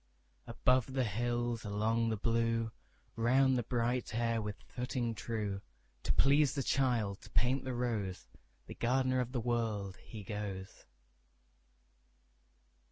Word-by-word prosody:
Above 125 Hz, +2 st, +2 dB
the 130 Hz, -1 st, +2 dB
hills, 120 Hz, +1 st, -1 dB
along 110 Hz, +2 st, +1 dB
the 110 Hz, -, 0 dB
blue, 115 Hz, +1 st, +1 dB, 0.4 s
Round 130 Hz, +3 st, +4 dB
the 125 Hz, -, +2 dB
bright 120 Hz, 0 st, -1 dB
air 115 Hz, -1 st, +1 dB
with 105 Hz, -1 st, -4 dB
footing 125 Hz, -1 st, -2 dB
true, 105 Hz, -3 st, -3 dB, 0.4 s
To -, -, -1 dB
please 140 Hz, +1 st, +4 dB
the 140 Hz, -, 0 dB
child, 120 Hz, -8 st, +1 dB
to -, -, -13 dB
paint 130 Hz, +3 st, +1 dB
the 130 Hz, -1 st, -2 dB
rose, 110 Hz, -7 st, -2 dB, 0.4 s
The -, -, -8 dB
gardener 130 Hz, +1 st, +2 dB
of 125 Hz, -1 st, -1 dB
the 125 Hz, -, -1 dB
World, 110 Hz, -5 st, -1 dB
he 110 Hz, -3 st, -9 dB
goes. 100 Hz, -2 st, -6 dB
115 Hz, 130 wpm, -34 LUFS, 110-125 Hz, 0.4 s, Round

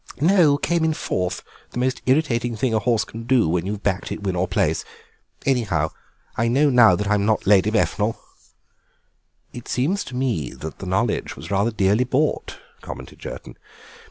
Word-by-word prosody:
"No, 160 Hz, -2 st, +4 dB
came 170 Hz, +2 st, 0 dB
in 160 Hz, -1 st, +1 dB
fourth, 90 Hz, -9 st, -2 dB, 0.3 s
the -, -, -6 dB
most 130 Hz, +1 st, 0 dB
irritating 125 Hz, -4 st, +1 dB
thing 115 Hz, +2 st, 0 dB
a 110 Hz, -, +3 dB
horse 110 Hz, 0 st, +1 dB
can 110 Hz, +2 st, -9 dB
do 125 Hz, -6 st, +3 dB
when 85 Hz, +2 st, 0 dB
you've 105 Hz, 0 st, -4 dB
backed 100 Hz, -1 st, -1 dB
it -, -, -5 dB
win 95 Hz, -2 st, -1 dB
or 90 Hz, +1 st, 0 dB
place. -, -, 0 dB, 0.6 s
Anyhow, 105 Hz, -, +1 dB, 0.4 s
I 115 Hz, -, +1 dB
know 140 Hz, +5 st, +3 dB
now 120 Hz, -7 st, +6 dB
that 105 Hz, +2 st, -3 dB
I'm 105 Hz, -1 st, +2 dB
not 110 Hz, 0 st, +1 dB
Lady 100 Hz, 0 st, +5 dB
Befnal." 110 Hz, 0 st, 0 dB, 1.4 s
"It 120 Hz, -, -9 dB
seems 165 Hz, +11 st, 0 dB
to 130 Hz, -, -8 dB
me 120 Hz, -, -1 dB
that 80 Hz, 0 st, -8 dB
the 95 Hz, -, -6 dB
knowledge 105 Hz, +5 st, -1 dB
was -, -, -9 dB
rather 100 Hz, +3 st, +2 dB
dearly 105 Hz, +1 st, +2 dB
bought," 135 Hz, +5 st, -1 dB, 0.2 s
commented -, -, -9 dB
Jerton. -, -, -8 dB
115 Hz, 175 wpm, -22 LUFS, 100-130 Hz, 1.4 s, now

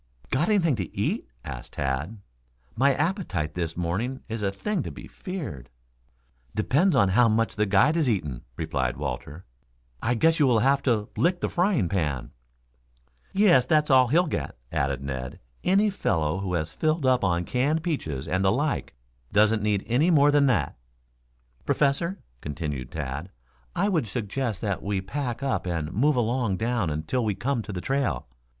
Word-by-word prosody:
"Got 150 Hz, +9 st, +1 dB
anything 175 Hz, -9 st, +3 dB
to 95 Hz, -4 st, -5 dB
eat?" -, -, -1 dB, 0.2 s
asked 65 Hz, -4 st, -8 dB
Tad. 70 Hz, +9 st, -2 dB, 0.6 s
"My 140 Hz, +4 st, +4 dB
appetite 160 Hz, -, -1 dB
this 85 Hz, -2 st, -3 dB
morning 100 Hz, +10 st, -2 dB
is 115 Hz, -1 st, -4 dB
a 100 Hz, -1 st, 0 dB
thing 200 Hz, -, -2 dB
to -, -, -5 dB
be -, -, -9 dB
feared." 105 Hz, -, -7 dB, 0.9 s
"Depends 145 Hz, -, +2 dB
upon 100 Hz, -7 st, +4 dB
how 115 Hz, +5 st, +5 dB
much 115 Hz, +1 st, +1 dB
the 105 Hz, -1 st, +1 dB
guide 105 Hz, +11 st, +4 dB
has 155 Hz, -6 st, +2 dB
eaten," 75 Hz, -, -2 dB, 0.2 s
replied 70 Hz, -6 st, -1 dB
Walter. 70 Hz, +7 st, -5 dB, 0.6 s
"I 120 Hz, -, +1 dB
guess 165 Hz, +8 st, +3 dB
you 145 Hz, -, +5 dB
will 120 Hz, -3 st, +4 dB
have 135 Hz, +5 st, +3 dB
to 110 Hz, -5 st, +1 dB
lick 175 Hz, +1 st, +2 dB
the -, -, -1 dB
frying 175 Hz, -, +2 dB
pan." 75 Hz, -9 st, -2 dB, 1.0 s
"Yes, 180 Hz, -11 st, +4 dB
that's 150 Hz, 0 st, +3 dB
all 130 Hz, -1 st, +6 dB
he'll 170 Hz, +8 st, +3 dB
get," 150 Hz, -, -4 dB
added 70 Hz, -1 st, -1 dB
Ned. 65 Hz, -2 st, -5 dB, 0.2 s
"Any 200 Hz, +3 st, +3 dB
fellow 80 Hz, -, 0 dB
who 95 Hz, -2 st, -2 dB
has 80 Hz, -2 st, -2 dB
filled 155 Hz, -2 st, 0 dB
up 130 Hz, -3 st, +3 dB
on 90 Hz, -2 st, +1 dB
canned 145 Hz, -, 0 dB
peaches 80 Hz, -, -3 dB
and 95 Hz, +1 st, 0 dB
the 95 Hz, -, +4 dB
like 145 Hz, +6 st, -1 dB, 0.4 s
doesn't 105 Hz, +1 st, +4 dB
need 105 Hz, -2 st, +1 dB
any 135 Hz, +9 st, +2 dB
more 145 Hz, -3 st, +5 dB
than 145 Hz, -1 st, +4 dB
that." 95 Hz, -, +1 dB, 0.9 s
"Professor," 160 Hz, +7 st, +1 dB, 0.2 s
continued 75 Hz, -3 st, -4 dB
Tad, 75 Hz, +3 st, -5 dB, 0.5 s
"I 195 Hz, +4 st, +2 dB
would 165 Hz, -, +1 dB
suggest 110 Hz, 0 st, -3 dB
that 100 Hz, -4 st, -1 dB
we 100 Hz, -1 st, -1 dB
pack 120 Hz, +5 st, -4 dB
up 135 Hz, -8 st, -1 dB
and 80 Hz, -3 st, -2 dB
move 145 Hz, +8 st, +3 dB
along 120 Hz, -4 st, 0 dB
down 115 Hz, -4 st, 0 dB
until 80 Hz, +12 st, -1 dB
we 105 Hz, -3 st, 0 dB
come 120 Hz, +5 st, -1 dB
to 105 Hz, -, -7 dB
the 90 Hz, -2 st, -4 dB
trail. 130 Hz, -, -1 dB
110 Hz, 170 wpm, -26 LUFS, 85-140 Hz, 1.0 s, all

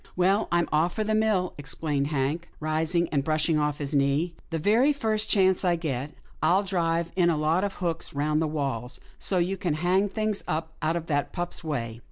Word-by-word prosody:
''Well, 195 Hz, +4 st, +3 dB
I'm 170 Hz, -1 st, +2 dB
off 160 Hz, +3 st, +2 dB
for 215 Hz, -, 0 dB
the 215 Hz, +1 st, -1 dB
mill," 215 Hz, -4 st, +1 dB
exclaimed 145 Hz, 0 st, -1 dB
Hank, 150 Hz, +3 st, -1 dB
rising 160 Hz, +2 st, +1 dB
and 140 Hz, -2 st, 0 dB
brushing 155 Hz, +1 st, +1 dB
off 150 Hz, -1 st, 0 dB
his 145 Hz, 0 st, -4 dB
knees. 140 Hz, +4 st, +2 dB
" -, -, -33 dB
The 165 Hz, -, -2 dB
very 225 Hz, -, +4 dB
first 220 Hz, -5 st, 0 dB
chance 190 Hz, -2 st, +3 dB
I 175 Hz, -2 st, +3 dB
get, 145 Hz, -4 st, -3 dB, 0.3 s
I'll 190 Hz, +3 st, +3 dB
drive 170 Hz, -3 st, 0 dB
in 175 Hz, -2 st, +4 dB
a 165 Hz, -, +1 dB
lot 155 Hz, +5 st, +1 dB
of 200 Hz, -, -2 dB
hooks 170 Hz, -5 st, -3 dB
round 150 Hz, +2 st, +1 dB
the 160 Hz, -, +1 dB
walls, 135 Hz, -5 st, -3 dB, 0.2 s
so 190 Hz, -, 0 dB
you 180 Hz, +2 st, 0 dB
can 175 Hz, -5 st, -1 dB
hang 185 Hz, +5 st, +2 dB
things 215 Hz, 0 st, -1 dB
up 160 Hz, +1 st, -2 dB
out 160 Hz, +1 st, +1 dB
of 170 Hz, -1 st, -3 dB
that 145 Hz, -3 st, -1 dB
pup's 175 Hz, -1 st, -4 dB
way. 115 Hz, -8 st, -3 dB
165 Hz, 210 wpm, -27 LUFS, 150-185 Hz, 0.3 s, very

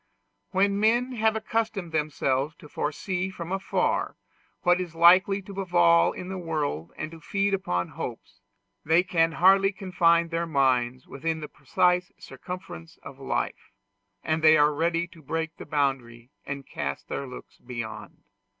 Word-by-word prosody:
When 200 Hz, +1 st, +2 dB
men 240 Hz, +4 st, +2 dB
have 220 Hz, -2 st, +1 dB
accustomed 215 Hz, -5 st, -2 dB
themselves 150 Hz, -2 st, 0 dB
to -, -, -14 dB
foresee 180 Hz, +6 st, -2 dB
from 175 Hz, -2 st, -7 dB
afar 195 Hz, 0 st, -1 dB, 0.5 s
what 175 Hz, 0 st, +3 dB
is 170 Hz, -3 st, -6 dB
likely 185 Hz, +4 st, +5 dB
to 200 Hz, -, -10 dB
befall 85 Hz, -, +4 dB
in 180 Hz, -, -8 dB
the 190 Hz, 0 st, -5 dB
world 150 Hz, -, -3 dB
and 155 Hz, -, -5 dB
to 165 Hz, -1 st, -12 dB
feed 200 Hz, +5 st, 0 dB
upon 90 Hz, -, -1 dB
hopes, -, -, -8 dB, 0.4 s
they 160 Hz, +4 st, +4 dB
can 165 Hz, -3 st, +1 dB
hardly 195 Hz, +5 st, +5 dB
confine 170 Hz, -4 st, +2 dB
their 170 Hz, 0 st, -2 dB
minds 130 Hz, -4 st, +1 dB
within 160 Hz, +3 st, -3 dB
the 150 Hz, -, -6 dB
precise 180 Hz, +6 st, +1 dB
circumference 180 Hz, -, -9 dB
of -, -, -11 dB
life, -, -, -3 dB, 0.5 s
and 160 Hz, 0 st, -1 dB
they 155 Hz, 0 st, +7 dB
are 150 Hz, 0 st, +4 dB
ready 170 Hz, +3 st, 0 dB
to 170 Hz, -2 st, -17 dB
break 160 Hz, +2 st, -3 dB
the -, -, -10 dB
boundary 135 Hz, -5 st, -2 dB, 0.2 s
and 140 Hz, -1 st, -5 dB
cast 70 Hz, -, -5 dB
their 140 Hz, -, -4 dB
looks 125 Hz, -, -11 dB
beyond. 110 Hz, -4 st, -7 dB
165 Hz, 150 wpm, -26 LUFS, 140-185 Hz, 0.5 s, they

